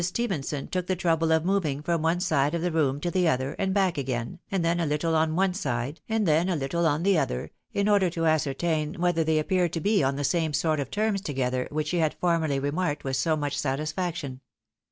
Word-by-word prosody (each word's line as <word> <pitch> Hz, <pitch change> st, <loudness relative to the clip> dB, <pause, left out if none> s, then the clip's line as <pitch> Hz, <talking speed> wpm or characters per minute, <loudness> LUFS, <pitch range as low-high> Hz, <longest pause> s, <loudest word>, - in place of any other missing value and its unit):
Stephenson 170 Hz, -, -2 dB
took 180 Hz, -1 st, -3 dB
the 185 Hz, -, +1 dB
trouble 165 Hz, -2 st, +1 dB
of 160 Hz, 0 st, +2 dB
moving 175 Hz, -8 st, 0 dB
from 170 Hz, 0 st, 0 dB
one 165 Hz, +2 st, +1 dB
side 155 Hz, -4 st, +1 dB
of 170 Hz, -, -2 dB
the 180 Hz, -, 0 dB
room 145 Hz, -4 st, +1 dB
to 175 Hz, +3 st, -2 dB
the 180 Hz, -1 st, +2 dB
other, 130 Hz, -2 st, 0 dB
said 190 Hz, -1 st, 0 dB
back 190 Hz, -5 st, +1 dB
again, 120 Hz, -3 st, -3 dB
and 190 Hz, -4 st, 0 dB
then 170 Hz, +1 st, +1 dB
a 170 Hz, -, +1 dB
little 150 Hz, +3 st, 0 dB
on 160 Hz, 0 st, +2 dB
one 190 Hz, +1 st, +2 dB
side, 140 Hz, -, -3 dB
and 220 Hz, -3 st, +1 dB
then 160 Hz, +4 st, +3 dB
a 180 Hz, -, +1 dB
little 160 Hz, +4 st, 0 dB
on 155 Hz, +1 st, 0 dB
the 195 Hz, -3 st, +4 dB
other, 100 Hz, -, -2 dB, 0.2 s
in 200 Hz, 0 st, 0 dB
order 200 Hz, -3 st, +4 dB
to 165 Hz, -1 st, -2 dB
ascertain 155 Hz, 0 st, 0 dB
whether 175 Hz, -1 st, +1 dB
thej 160 Hz, 0 st, +2 dB
appeared 175 Hz, +2 st, +1 dB
to 165 Hz, -, -1 dB
be 200 Hz, +3 st, +2 dB
on 135 Hz, 0 st, +1 dB
the 145 Hz, -, -3 dB
same 160 Hz, +1 st, 0 dB
sort 155 Hz, 0 st, +1 dB
of 135 Hz, -2 st, -3 dB
terms 210 Hz, +1 st, 0 dB
together 130 Hz, -5 st, -1 dB
which 150 Hz, 0 st, -2 dB
she 180 Hz, -, 0 dB
had 160 Hz, -2 st, +1 dB
formerly 165 Hz, -5 st, +1 dB
remarked 145 Hz, +3 st, -1 dB
with 135 Hz, -1 st, -2 dB
so 160 Hz, +2 st, +1 dB
much 145 Hz, -1 st, -2 dB
satisfaction. 150 Hz, 0 st, -3 dB
160 Hz, 230 wpm, -26 LUFS, 145-180 Hz, 0.2 s, the